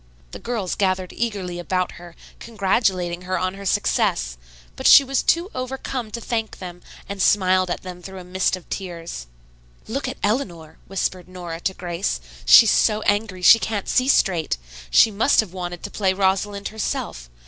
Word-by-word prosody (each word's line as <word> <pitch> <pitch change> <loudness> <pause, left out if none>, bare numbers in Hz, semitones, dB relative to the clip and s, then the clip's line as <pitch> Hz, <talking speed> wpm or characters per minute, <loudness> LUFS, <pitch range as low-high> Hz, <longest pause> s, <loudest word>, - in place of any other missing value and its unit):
The - - -8
girls 225 -7 -3
gathered 185 -2 -1
eagerly 195 -7 -3
about 185 +1 -1
her, 175 -1 -13 0.2
congratulating 190 -5 0
her 185 +1 -2
on 185 +1 -1
her 200 0 -7
success, - - +1 0.4
but - - 0
she 280 - +9
was 270 0 0
too 345 +5 +1
overcome 255 -2 -4
to 235 - -5
thank 225 -1 -3
them, 180 -1 -9 0.3
and 200 -1 -5
smiled 185 -2 +3
at 175 - -3
them 180 -1 -8
through 190 +1 -9
a 185 - -8
mist 185 +1 0
of 185 - -13
tears. 170 - -6 0.6
"Look 275 +4 -3
at 260 - -5
Eleanor," 180 - -2
whispered 185 -1 -3
Nora 175 -3 -7
to 190 +2 -2
Grace. 175 - -3 0.3
"She's - - +9
so 215 0 +2
angry 205 -3 0
she 225 +5 +8
can't 215 -3 -3
see 255 0 +2
straight. 175 - +2 0.3
She 220 - +6
must 220 +7 +2
have 210 -5 +1
wanted 175 -2 -6
to - - -6
play 190 -3 +1
Rosalind 200 +1 0
herself. 60 - -4
190 Hz, 170 wpm, -22 LUFS, 180-215 Hz, 0.6 s, she